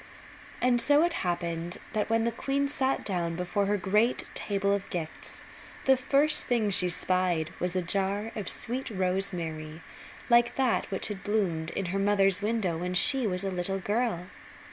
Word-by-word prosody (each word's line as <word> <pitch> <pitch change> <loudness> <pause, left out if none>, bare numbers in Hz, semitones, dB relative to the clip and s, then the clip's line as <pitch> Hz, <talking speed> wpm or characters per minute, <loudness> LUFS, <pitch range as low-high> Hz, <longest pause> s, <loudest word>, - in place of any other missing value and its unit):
And 245 -1 +3
so 290 +5 +4
it 345 0 +1
happened 170 -1 -2 0.2
that 215 0 -1
when 225 0 +2
the 235 - +1
queen 275 +4 -1
sat 270 -1 -1
down 170 -4 -1
before 180 +3 -1
her 205 +1 +1
great 210 +6 +1
table 200 -1 0
of 200 -1 -3
gifts 160 -3 -6 0.4
the 265 - +6
first 280 +4 +2
thing 225 -4 +1
she 180 -1 +5
spied 175 -2 0
was 180 +1 -2
a 185 - 0
jar 200 +4 -1
of 210 -4 -3
sweet 255 +3 -2
rosemary 180 -5 -3 0.4
like 240 -1 +4
that 260 -3 +1
which 195 +1 -1
had 200 -2 -6
bloomed 180 -7 0
in 195 - -1
her 195 - 0
mother's 195 -1 +2
window 205 -6 0
when 180 +1 -3
she 260 +6 +4
was 180 -1 -2
a 195 - -2
little 185 +1 -2
girl. 205 -2 -1
195 Hz, 170 wpm, -28 LUFS, 180-230 Hz, 0.4 s, the